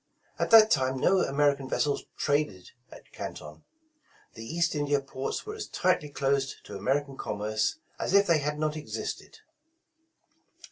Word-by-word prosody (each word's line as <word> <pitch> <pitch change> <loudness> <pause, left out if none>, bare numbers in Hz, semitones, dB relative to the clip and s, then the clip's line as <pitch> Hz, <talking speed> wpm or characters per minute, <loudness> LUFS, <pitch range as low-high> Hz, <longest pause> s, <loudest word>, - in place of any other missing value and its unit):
At - - 0
that 220 -1 +8
time 130 -2 +2
no 185 +8 +3
American 140 -2 +1
vessels 145 +1 0
traded 140 -11 -1 0.2
at - - -15
Canton. 75 0 -8 0.7
The 115 - -9
East 170 +8 0
India 145 -1 +1
ports 135 - -5
were 425 - -5
as 430 -1 -6
tightly 180 -5 0
closed 135 -1 0
to - - -9
American 140 0 -1
commerce 110 - -1 0.2
as 195 - 0
if 200 0 +6
they 165 -4 +3
had 150 +1 -2
not 155 0 -1
existed. 295 - -6
145 Hz, 145 wpm, -28 LUFS, 135-165 Hz, 0.7 s, that